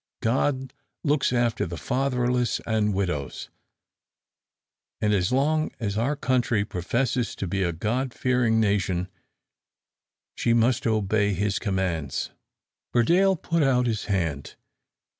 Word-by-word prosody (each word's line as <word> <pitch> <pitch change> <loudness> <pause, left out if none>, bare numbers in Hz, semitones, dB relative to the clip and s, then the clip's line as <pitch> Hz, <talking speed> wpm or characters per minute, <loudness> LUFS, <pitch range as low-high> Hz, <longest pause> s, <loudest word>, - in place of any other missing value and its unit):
God 130 +2 0 0.3
looks 145 -4 +2
after 120 -5 +1
the 85 0 -6
fatherless 125 - 0
and 110 -2 +1
widows, 90 -8 -3 1.5
and 105 -1 +1
as 95 0 +1
long 155 +4 +2
as 105 -3 -2
our 120 +7 0
country 125 -6 +1
professes 115 +7 -1
to - - -4
be 95 +2 -2
a 85 -2 +1
God 120 +10 -2
fearing 125 -3 +1
nation, 95 -4 0 1.2
she 115 - +1
must 120 +3 +2
obey 105 -2 +1
His 100 +2 0
commands." 95 -9 -2 0.6
Burdale 180 +11 +4
put 170 0 -1
out 130 -3 +3
his 110 -3 -1
hand. 80 -9 -2
110 Hz, 120 wpm, -25 LUFS, 100-130 Hz, 1.5 s, Burdale